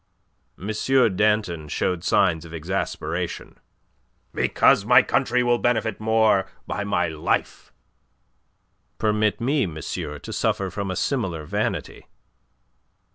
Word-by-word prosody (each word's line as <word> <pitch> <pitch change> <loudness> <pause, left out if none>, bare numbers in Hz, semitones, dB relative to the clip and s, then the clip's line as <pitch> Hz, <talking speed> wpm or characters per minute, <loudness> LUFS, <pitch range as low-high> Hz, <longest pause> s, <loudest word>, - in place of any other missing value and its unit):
M. 100 +4 -4 0.4
Danton 105 -6 +1
showed 90 +3 -1
signs 85 -5 +2
of 85 0 -9
exasperation. 90 +5 -4 0.7
"Because - - +3
my - - +6
country 125 +1 +1
will 120 -1 +2
benefit 110 -3 0
more 110 -3 +3 0.2
by 100 - -3
my 100 -4 0
life." 80 -2 -2 1.3
"Permit 105 0 +1
me, 130 -1 +1
monsieur, 75 -2 -5
to - - -8
suffer 95 -2 -1
from 100 -2 -4
a 95 - -2
similar 90 - -2
vanity." 100 -1 -3
100 Hz, 110 wpm, -23 LUFS, 85-110 Hz, 1.3 s, my